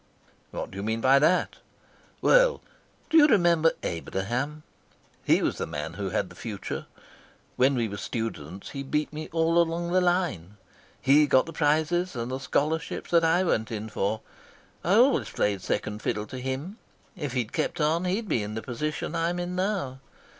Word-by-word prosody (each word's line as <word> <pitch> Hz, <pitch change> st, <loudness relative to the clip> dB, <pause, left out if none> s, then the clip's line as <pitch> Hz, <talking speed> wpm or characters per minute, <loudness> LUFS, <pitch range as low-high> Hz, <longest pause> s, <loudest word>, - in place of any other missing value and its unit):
"What -, -, -6 dB
do 95 Hz, -, -9 dB
you -, -, -3 dB
mean 110 Hz, +2 st, -1 dB
by 135 Hz, +3 st, +5 dB
that?" 170 Hz, +5 st, +2 dB, 0.6 s
"Well, -, -, +5 dB, 0.5 s
do 325 Hz, -, +6 dB
you 300 Hz, -2 st, +8 dB
remember 170 Hz, -, +4 dB
Abraham? 120 Hz, -, -3 dB, 0.6 s
He -, -, +3 dB
was -, -, -1 dB
the -, -, -2 dB
man 75 Hz, +2 st, -5 dB
who 100 Hz, +1 st, -3 dB
had 95 Hz, 0 st, -1 dB
the -, -, -13 dB
future. 105 Hz, -4 st, -5 dB, 0.7 s
When 135 Hz, +2 st, +3 dB
we 120 Hz, -2 st, 0 dB
were 100 Hz, -1 st, -6 dB
students 100 Hz, -, -5 dB
he 140 Hz, -, -5 dB
beat 150 Hz, +3 st, -2 dB
me 155 Hz, +1 st, -6 dB
all 165 Hz, +1 st, +3 dB
along 170 Hz, +1 st, -1 dB
the 185 Hz, +1 st, +3 dB
line. 175 Hz, -, 0 dB, 0.4 s
He 145 Hz, +3 st, +5 dB
got 130 Hz, -1 st, +4 dB
the 165 Hz, -, -8 dB
prizes 160 Hz, +3 st, +1 dB
and 120 Hz, +1 st, -3 dB
the 130 Hz, -, -3 dB
scholarships 150 Hz, +3 st, -1 dB
that 170 Hz, -1 st, +5 dB
I 165 Hz, +3 st, +3 dB
went 110 Hz, -11 st, 0 dB
in 110 Hz, 0 st, -4 dB
for. 110 Hz, +1 st, -1 dB, 0.6 s
I 180 Hz, +4 st, +3 dB
always 255 Hz, +5 st, +4 dB
played 100 Hz, -2 st, 0 dB
second 105 Hz, +2 st, -2 dB
fiddle 105 Hz, 0 st, -2 dB
to 130 Hz, +4 st, -7 dB
him. 135 Hz, -, -4 dB, 0.4 s
If 145 Hz, -8 st, -4 dB
he'd 120 Hz, -4 st, -2 dB
kept 175 Hz, -, -1 dB
on 160 Hz, +4 st, +1 dB
he'd 200 Hz, +5 st, -1 dB
be 120 Hz, -, +1 dB
in 105 Hz, +1 st, -5 dB
the 110 Hz, -, -4 dB
position 150 Hz, +6 st, -3 dB
I'm 170 Hz, +1 st, 0 dB
in 175 Hz, +1 st, -3 dB
now. 185 Hz, -9 st, -1 dB
145 Hz, 180 wpm, -27 LUFS, 110-170 Hz, 0.7 s, you